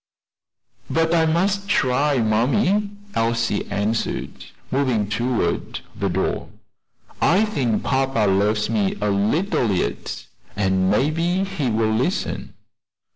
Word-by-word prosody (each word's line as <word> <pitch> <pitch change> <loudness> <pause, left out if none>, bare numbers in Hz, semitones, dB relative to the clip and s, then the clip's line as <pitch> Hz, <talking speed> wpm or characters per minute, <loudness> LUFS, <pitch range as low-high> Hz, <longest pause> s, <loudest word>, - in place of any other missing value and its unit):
"But 165 0 +1
I 165 -1 +3
must 195 +5 +1
try, 140 -4 +2
mammy," 140 - +2 0.2
Elsie 115 -2 0
answered, 110 +3 -2 0.3
moving 130 -6 +1
toward 120 +3 -1
the 100 -1 -1
door. 95 +2 -2 0.7
"I 190 +6 +4
think 130 - -1
papa 135 -5 +1
loves 105 +2 +2
me 105 -4 0
a 105 0 0
little 115 - +1
yet, 95 - -3 0.3
and 95 -2 +1
maybe 165 - +1
he 190 -9 -2
will 110 0 +1
listen." 130 - -2
120 Hz, 110 wpm, -22 LUFS, 105-165 Hz, 0.7 s, I